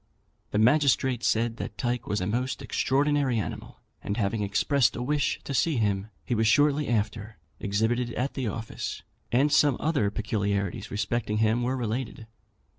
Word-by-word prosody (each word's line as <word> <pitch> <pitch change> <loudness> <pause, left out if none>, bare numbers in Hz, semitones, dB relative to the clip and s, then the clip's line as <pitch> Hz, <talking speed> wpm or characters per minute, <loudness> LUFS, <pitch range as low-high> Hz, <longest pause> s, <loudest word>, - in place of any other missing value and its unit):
The - - -2
magistrate 130 0 +3
said 115 +1 +1
that - - -6
Tyke 120 0 -2
was 105 -1 -1
a - - -1
most 120 +4 -2
extraordinary 140 -2 +1
animal; 105 - -5 0.2
and 100 - -3
having 105 0 0
expressed 105 +5 +2
a - - -4
wish 145 +2 0
to 140 - -5
see 150 +2 +2
him, 100 -2 0 0.2
he - - -1
was 110 -1 +2
shortly 145 +4 +3
after 110 -2 -2 0.2
exhibited 110 +4 0
at 130 +3 -1
the 130 -4 -2
office, 110 +1 -5 0.3
and 135 +5 +3
some 145 -4 +4
other 145 -10 +1
peculiarities 100 -2 -2
respecting 105 +1 -1
him 110 +2 +2
were 130 +2 0
related. 115 -1 -3
120 Hz, 160 wpm, -27 LUFS, 105-130 Hz, 0.3 s, some